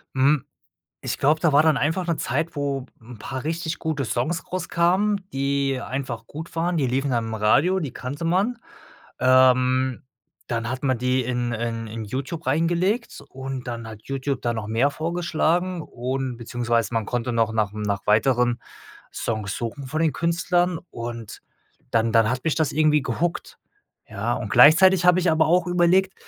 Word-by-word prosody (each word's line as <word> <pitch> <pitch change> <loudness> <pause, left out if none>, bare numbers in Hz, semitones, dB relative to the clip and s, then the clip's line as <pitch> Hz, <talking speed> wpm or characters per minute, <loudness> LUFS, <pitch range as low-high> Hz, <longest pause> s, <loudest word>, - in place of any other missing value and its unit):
Hm, 135 +1 +3 0.6
ich - - -3
glaube, 150 +3 +2
da 160 -3 +2
war 145 - +6
dann 155 -2 +3
einfach 165 +6 0
'ne 170 - 0
Zeit, 155 +5 -2
wo 140 -2 -2
'n 115 0 -12
paar 130 +5 -6
richtig 165 +1 -3
gute 155 -4 -2
Songs 125 +9 -1
rauskamen, 185 +3 +1
die 135 -1 0
einfach 125 -4 -5
gut 160 +5 -9
waren. 170 +2 0
Die 145 -4 +1
liefen 135 +2 0
dann 115 -2 0
im 110 - -4
Radio, 140 - +3
die 150 -7 -4
kannte 140 +6 -6
man. 195 +8 +1 0.6
Ähm, 130 0 +3 0.4
dann 115 0 -2
hat 130 - -4
man 130 -1 +2
die 125 +1 0
in 120 -1 -2
in 115 -1 -4
Youtube 135 +9 -5
reingelegt 175 - 0
und 135 -1 -6
dann 115 -1 -5
hat 110 -1 -10
Youtube 135 -1 -3
da 120 - -1
noch 110 -1 -4
mehr 120 +6 +2
vorgeschlagen 170 +2 -1
und 130 -1 -4
beziehungsweise 120 -1 -1
man 115 -2 0
konnte 120 +1 -2
noch 115 -1 +1
nach 110 -2 0
m 105 0 -5
nach 100 -2 -2
weiteren 120 +2 +3 0.6
Songs 110 -4 -3
suchen 120 +4 -5
von 155 +4 -2
den 160 - +3
Künstlern 170 +2 0
und 115 -2 -7 0.5
dann 115 0 +2
dann 115 0 +4
hat 130 0 -2
mich 160 - 0
das 160 -3 +1
irgendwie 150 -1 +3
gehookt, 165 +7 -3 0.5
ja. - - -2
Und - - -4
gleichzeitig 180 +4 +6
habe 180 0 +6
ich 175 -2 +2
aber 160 0 +3
auch 175 +2 +3
überlegt: 180 +2 +3
135 Hz, 170 wpm, -23 LUFS, 120-165 Hz, 0.6 s, war